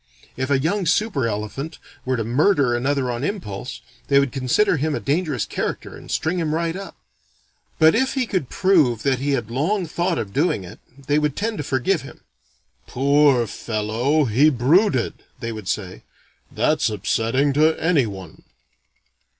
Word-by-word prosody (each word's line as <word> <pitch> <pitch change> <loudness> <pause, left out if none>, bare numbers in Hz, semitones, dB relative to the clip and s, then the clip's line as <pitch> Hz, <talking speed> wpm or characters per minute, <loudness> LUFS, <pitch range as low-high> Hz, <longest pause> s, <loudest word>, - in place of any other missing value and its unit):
If 130 +1 -3
a 140 - +3
young 175 +7 0
super 170 - +1
elephant 115 +9 -4 0.3
were 130 0 0
to 115 - -1
murder 135 - +2
another 130 +1 0
on 120 +2 -4
impulse, 130 - -5 0.3
they 140 - +4
would 140 -2 0
consider 140 +9 +1
him 150 +1 -1
a - - -2
dangerous 150 -3 -1
character - - -4
and - - -13
string 170 +4 -1
him 155 -2 -1
right 165 0 -1
up. 195 0 -8 0.8
But 160 0 +6
if 265 +4 +1
he 260 -2 +1
could 185 - -2
prove 155 - +2
that 135 -3 +1
he 140 +1 0
had 120 -4 -2
long 175 - 0
thought 170 +2 -1
of 100 -2 -4
doing 145 - +1
it, 85 - -11 0.3
they 145 +2 +2
would 150 -2 -1
tend 220 +1 -2
to - - -2
forgive 145 +6 0
him. 135 - -12 0.7
"Poor 140 -2 +3
fellow, 115 +8 -1
he 130 +7 +4
brooded," 140 - +2 0.3
they 115 - -4
would 110 -4 -8
say. 95 -2 -3 0.5
"That's - - +1
upsetting 115 +7 0
to 155 +3 +4
any 160 -7 +2
one." 95 -5 -9
140 Hz, 165 wpm, -22 LUFS, 120-165 Hz, 0.8 s, But